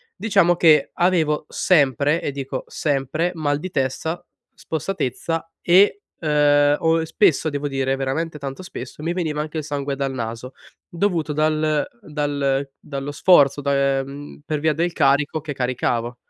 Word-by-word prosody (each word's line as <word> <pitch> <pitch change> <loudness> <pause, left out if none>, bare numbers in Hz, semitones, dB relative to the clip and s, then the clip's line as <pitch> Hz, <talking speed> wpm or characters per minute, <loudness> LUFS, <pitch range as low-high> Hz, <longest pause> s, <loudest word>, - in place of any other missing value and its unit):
diciamo 175 -5 +3
che 160 -3 +4
avevo 160 -4 +1
sempre 145 -2 +2
e 145 - -2
dico 135 -1 -5
sempre 150 +4 -1
mal 145 -2 -1
di 185 - -5
testa, 135 +6 -2 0.3
spossatezza 165 -1 -3 0.2
e, 200 - +5 0.2
uhm, 145 -1 +4
ho 165 0 +2
spesso 160 -2 +2
devo 145 0 -2
dire, 135 -1 -1
veramente 150 +4 -3
tanto 140 +5 -6
spesso, 150 -4 -9
mi 170 +1 -1
veniva 155 -4 -2
anche 155 +1 -5
il - - -5
sangue 140 -2 -3
dal 135 -1 -2
naso, 115 +1 -5 0.4
dovuto 170 -4 -1
dal 155 0 +1
dal 140 -2 -1
dallo 140 0 -6
sforzo 145 -3 +4
da 140 -1 +1
ehm, 140 +2 -8
per 155 -1 -2
via 155 0 +2
del 170 +3 0
carico 145 +2 +2
che 150 -2 -5
caricavo. 120 -2 -1
145 Hz, 145 wpm, -22 LUFS, 135-160 Hz, 0.4 s, e